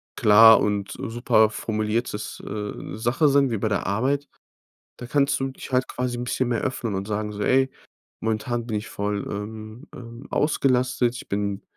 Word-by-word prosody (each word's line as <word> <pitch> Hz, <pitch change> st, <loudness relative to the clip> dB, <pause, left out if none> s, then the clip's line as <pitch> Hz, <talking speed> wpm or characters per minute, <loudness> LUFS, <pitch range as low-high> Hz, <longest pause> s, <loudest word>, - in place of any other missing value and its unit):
klar 110 Hz, +2 st, +8 dB
und 100 Hz, -1 st, -1 dB
super 115 Hz, -2 st, +2 dB
formuliertes, 110 Hz, 0 st, -3 dB
äh, 105 Hz, 0 st, -6 dB
Sache 125 Hz, +7 st, +2 dB
sein 140 Hz, -2 st, +3 dB
wie 115 Hz, -, 0 dB
bei 110 Hz, -, 0 dB
der 100 Hz, -, -1 dB
Arbeit. 135 Hz, +8 st, 0 dB, 0.7 s
Da 125 Hz, -, -7 dB
kannst 140 Hz, +2 st, +1 dB
du 135 Hz, -, 0 dB
dich 130 Hz, -, -10 dB
halt 130 Hz, +1 st, +1 dB
quasi 125 Hz, -1 st, -3 dB
'n 120 Hz, -, -3 dB
bisschen 125 Hz, 0 st, -1 dB
mehr 120 Hz, -, 0 dB
öffnen 120 Hz, -5 st, -2 dB
und 95 Hz, +2 st, -4 dB
sagen 105 Hz, 0 st, -2 dB
so: 105 Hz, 0 st, -5 dB
„Ey, 130 Hz, +3 st, +3 dB, 0.5 s
momentan 115 Hz, +2 st, -2 dB
bin 110 Hz, -3 st, -2 dB
ich 110 Hz, +2 st, -8 dB
voll, 100 Hz, 0 st, -3 dB
ähm 110 Hz, +2 st, -7 dB
ähm, 120 Hz, +1 st, -10 dB
ausgelastet. 125 Hz, -4 st, +1 dB
Ich -, -, -10 dB
bin 100 Hz, 0 st, -2 dB
115 Hz, 175 wpm, -24 LUFS, 105-125 Hz, 0.7 s, klar